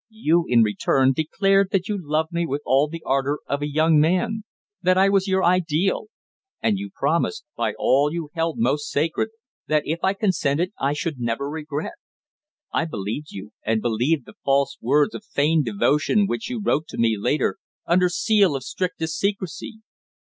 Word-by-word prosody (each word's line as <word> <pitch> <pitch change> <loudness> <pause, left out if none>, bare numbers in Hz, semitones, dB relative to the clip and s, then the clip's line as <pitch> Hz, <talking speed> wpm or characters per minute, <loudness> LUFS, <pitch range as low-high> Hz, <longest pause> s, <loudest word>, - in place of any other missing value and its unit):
You, 175 -7 +1
in 120 -2 +5
return, 130 +6 +2
declared 195 +7 +2
that 195 -1 0
you 210 - -1
loved 160 -2 -1
me 170 0 -1
with 145 +1 -3
all 135 +4 +3
the 165 +1 -8
ardour 140 +2 0
of 140 +1 -2
a 145 - -2
young 155 +1 +3
man; 205 +7 +1 0.4
that 185 +1 +3
I 195 +1 +5
was 195 0 +2
your 190 0 +1
ideal; 175 - +1 0.5
and 205 -3 +1
you 200 0 -5
promised, 170 - -1
by - - -1
all 140 +3 +3
you 165 -2 -5
held 165 +1 -1
most 150 -10 0
sacred, 160 +8 0 0.4
that 155 -1 +2
if 160 +3 -2
I 190 +1 +2
consented 185 -3 0
I 140 +1 +1
should 150 -1 -3
never 120 +3 -2
regret. 150 0 -4 0.8
I 165 - +1
believed 115 +1 -4
you, 100 +2 -9
and 110 0 +1
believed 120 +6 0
the - - -13
false 140 0 +2
words 145 - +2
of - - -7
feigned 155 -5 +1
devotion 145 - +2
which 220 +4 -3
you 250 -2 -3
wrote 160 -6 0
to - - -9
me 115 -1 +2
later 125 - 0 0.3
under 180 +1 +3
seal 200 -3 +2
of 135 - -4
strictest 165 -1 -3
secrecy. 200 +2 -3
160 Hz, 180 wpm, -23 LUFS, 140-190 Hz, 0.8 s, in